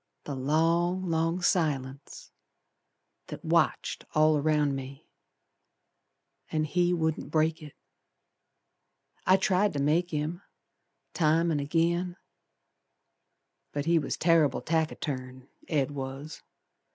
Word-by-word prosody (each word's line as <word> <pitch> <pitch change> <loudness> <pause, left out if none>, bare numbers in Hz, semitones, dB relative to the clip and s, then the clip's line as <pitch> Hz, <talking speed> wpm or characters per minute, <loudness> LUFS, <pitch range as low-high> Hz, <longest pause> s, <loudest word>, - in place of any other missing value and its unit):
The 145 - -5
long, 165 +7 +1
long 165 +2 0
silence, 140 -6 -1 1.0
That - - -9
watched - - +1
all 155 0 +5
around 150 -1 +1
me, 135 +1 -8 1.4
And 155 -1 0
he 175 +3 +1
wouldn't 160 -3 -1
break 160 +1 +1
it. 150 -2 -11 1.5
I 185 +1 +6
tried 190 +2 +2
to 145 - -2
make 160 +5 +2
him, 155 +3 -3 0.7
Time 165 +1 +2
an' 150 - 0
agin, 170 +4 0 1.6
But 145 0 -2
he 170 0 +3
was 145 - -3
terrible 160 -5 +3
taciturn, 135 -5 -3 0.2
Ed 145 -4 0
was. 140 +2 -6
155 Hz, 105 wpm, -28 LUFS, 145-170 Hz, 1.6 s, I